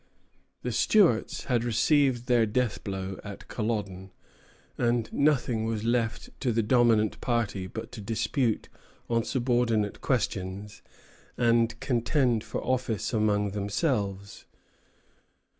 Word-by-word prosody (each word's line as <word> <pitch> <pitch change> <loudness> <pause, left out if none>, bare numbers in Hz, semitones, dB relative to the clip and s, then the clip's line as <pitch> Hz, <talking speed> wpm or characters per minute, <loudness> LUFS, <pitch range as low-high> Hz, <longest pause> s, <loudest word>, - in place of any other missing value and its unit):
The - - -2
Stuarts 175 - +3
had 120 -2 0
received 125 +1 +2
their 120 -3 +3
death 120 +1 -1
blow 95 -1 -4
at 100 -2 -9
Culloden; 100 -4 -3 0.7
and 120 -2 +1
nothing 130 -6 +2
was 110 -1 -2
left 115 -1 -1
to 125 - 0
the 115 0 +1
dominant 115 -2 +3
party 110 -6 -1
but 110 +4 -7
to 120 -3 -8
dispute 115 +2 -1 0.4
on 115 -1 +2
subordinate 120 -5 0
questions, 100 -5 -2 0.6
and 115 -1 +2
contend 120 -2 +1
for - - -5
office 125 -3 -1
among 105 -2 +1
themselves. 100 - -2
115 Hz, 110 wpm, -28 LUFS, 105-125 Hz, 0.7 s, Stuarts